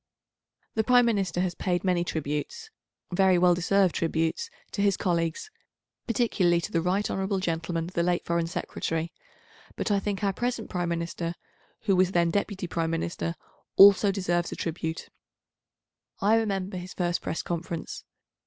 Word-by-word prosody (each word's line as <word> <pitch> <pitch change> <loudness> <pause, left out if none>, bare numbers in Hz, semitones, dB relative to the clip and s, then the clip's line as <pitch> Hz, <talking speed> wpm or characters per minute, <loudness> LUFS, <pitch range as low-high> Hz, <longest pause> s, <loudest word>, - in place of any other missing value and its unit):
The 220 - +1
Prime 245 +1 +5
Minister 195 -6 0
has 180 -1 0
paid 175 0 -1
many 180 -2 +2
tributes, 155 - -4 0.4
very 185 0 +4
well 175 0 +5
deserved 185 +1 +2
tributes, 165 - -1 0.2
to 200 - -2
his 200 -2 +3
colleagues, 170 - -1 0.6
particularly 200 -8 +2
to 205 - -5
the 165 - +1
right 190 +4 +1
hon. 195 0 -1
Gentleman 165 -1 -2
the 170 0 -2
late 175 0 0
Foreign 170 -1 0
Secretary, 165 -1 -3 0.6
but - - -2
I 200 - +3
think 200 0 -3
our 195 -1 +2
present 240 +2 -3
Prime 175 -1 -1
Minister, 170 0 -3 0.5
who 200 -4 +2
was 185 +1 +3
then 170 -1 +3
Deputy 200 -1 -1
Prime 165 -1 -1
Minister, 165 0 -2 0.4
also 200 0 +8
deserves 175 -3 -1
a - - -4
tribute. 165 0 -4 1.1
I 210 +3 +4
remember 195 -4 -1
his 180 +1 -8
first 175 -1 0
Press 160 - -3
conference. 170 -1 -4
180 Hz, 155 wpm, -27 LUFS, 170-200 Hz, 1.1 s, also